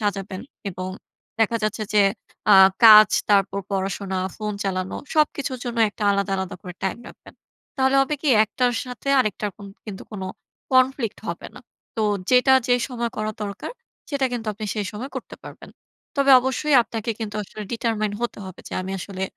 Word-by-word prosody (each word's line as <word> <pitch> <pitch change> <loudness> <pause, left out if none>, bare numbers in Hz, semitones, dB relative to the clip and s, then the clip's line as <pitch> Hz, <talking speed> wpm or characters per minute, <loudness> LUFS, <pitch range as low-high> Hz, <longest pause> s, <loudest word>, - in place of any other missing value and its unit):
সাজাবেন 195 -2 -3 0.3
এবং 185 +1 -5 0.5
দেখা 230 +1 +3
যাচ্ছে 215 +1 -2
যে 205 - +6 0.5
আ - - +9 0.3
কাজ 215 -1 +10 0.2
তারপর 200 -1 +3
পড়াশোনা, 195 0 -2 0.2
ফোন 210 -1 -3
চালানো 185 -1 -2 0.2
সবকিছুর 285 -4 +1
জন্য 240 -1 -4
একটা 210 - -9
আলাদা, 200 0 0
আলাদা 190 0 -4
করে 180 -1 -8
টাইম 190 +4 -2
রাখবেন। - - -16 0.4
তাহলে 265 0 +3
হবে 270 +2 +1
কি 305 - 0 0.2
একটার 245 +3 0
সাথে 250 +2 -7
আরেকটার 210 -2 -2
কন 205 - -11 0.2
কিন্তু 195 -2 -7
কোন 195 - -6 0.5
conflict 255 -3 +2
হবে - - -5
না। - - -11 0.4
তো 220 - 0 0.3
যেটা 250 +1 +5 0.2
যে 245 - +5
সময় 240 -2 -3
করা 215 0 -2
দরকার, 200 - -5 0.4
সেটা 280 -2 +1
কিন্তু 235 -2 -4
আপনি 215 +1 -7
সেই 205 -2 -2
সময় 245 +7 -6
করতে - - -7
পারবেন। - - -11 0.5
তবে 275 0 +3
অবশ্যই 265 +3 0
আপনাকে 225 0 -4
কিন্তু 215 -2 -5
আসলে 210 +2 -9
determine 220 -3 -1
হতে 240 - -3
হবে 185 - -10
যে - - -12
আমি 190 +1 -5
আসলে 190 0 -6
215 Hz, 170 wpm, -23 LUFS, 200-250 Hz, 0.5 s, কাজ